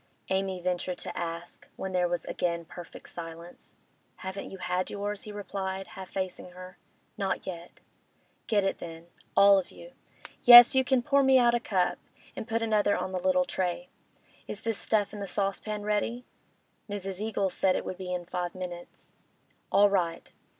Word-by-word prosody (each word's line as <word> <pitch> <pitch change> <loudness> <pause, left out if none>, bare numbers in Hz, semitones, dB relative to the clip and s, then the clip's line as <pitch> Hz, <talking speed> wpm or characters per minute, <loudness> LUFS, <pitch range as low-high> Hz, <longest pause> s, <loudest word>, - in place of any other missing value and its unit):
Amy 190 -1 0
ventured 180 0 -2
to - - -6
ask, 170 0 -5
when 190 - -5
there 180 -1 +2
was 175 -1 -2
again 170 -1 -2
perfect 175 +1 -11
silence. 170 0 -9 0.4
'Haven't 190 +1 -6
you 195 - -8
had 180 0 -1
yours?' 205 0 -4
he 210 - -7
replied, 195 -2 -5
half 190 -1 -9
facing 185 -1 -4
her. 185 +1 -11 0.4
'Not 195 -2 -1
yet.' 175 -1 -8 0.7
'Get 210 -3 +2
it, 195 - -1
then—all 170 +4 +2
of 185 - -6
you. - - -13 0.5
Yes, 240 0 +11
you 265 0 +4
can 255 -1 +2
pour 280 0 +3
me 265 -1 +5
out 240 -1 +5
a 240 - +2
cup—and 195 +2 -3
put 230 -1 -1
another 210 -2 +2
on 185 - -3
the 185 - -2
little 275 +6 +2
tray. 190 -1 -2 0.6
Is 205 - -6
this 225 -2 -2
stuff 210 -2 0
in 210 - -7
the 200 - -4
saucepan 205 +2 -2
ready?' 220 +4 -1 0.6
'Mrs. 195 -1 -4
Eagles 200 -3 -1
said 190 -1 +2
it - - -2
would 185 - -5
be 185 -1 -5
in 180 -1 -3
five 175 0 -4
minutes.'. 175 -1 -8 0.6
'All 205 +1 +6
right. 175 -4 -1
190 Hz, 170 wpm, -29 LUFS, 180-210 Hz, 0.7 s, Yes